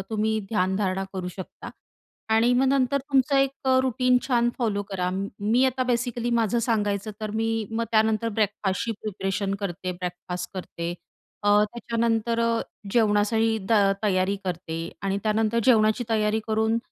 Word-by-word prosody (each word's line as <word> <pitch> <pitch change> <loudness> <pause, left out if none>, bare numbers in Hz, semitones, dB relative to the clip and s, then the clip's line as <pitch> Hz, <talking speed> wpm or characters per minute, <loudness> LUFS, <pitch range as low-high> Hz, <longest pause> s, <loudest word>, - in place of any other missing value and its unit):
तुम्ही 220 0 0
ध्यानधारणा 190 -1 0
करू 185 -2 -4
शकता 185 - -8 0.6
आणि 230 +2 +4
मग 260 +2 +3
नंतर 270 0 +2
तुमचं 270 +1 +3
अ, - - +5
एक 270 0 +3 0.2
अ, 260 0 +5
रूटीन 255 0 +2
छान 240 -2 +3
फॉलो 215 -5 0
करा. 180 -2 -1 0.3
मी 225 +5 +3
अ, - - +6
आता 255 0 -2
बेसिकली 240 0 -1
माझं 225 +1 +1
सांगायचं, 215 -3 0
तर 215 -1 -3
मी 225 0 0 0.2
मग 225 +1 -1
त्यानंतर 220 0 +2
ब्रेकफास्टची 205 +1 0
प्रिपरेशन 195 -1 -2
करते, 185 -1 -3
ब्रेकफास्ट 180 0 -5
करते 170 -2 -5 0.5
अ, 205 - +1 0.2
त्याच्यानंतर 230 +1 -1
अ, 230 0 +2 0.3
जेवणासाठी 220 0 +2
त - - +5 0.3
तयारी 195 -1 +1
करते 170 -2 -4 0.2
आणि 195 0 0
त्यानंतर 220 +1 +1
जेवणाची 220 -1 +4
तयारी 215 0 +1
करून 220 +1 +1
220 Hz, 150 wpm, -25 LUFS, 195-235 Hz, 0.6 s, अ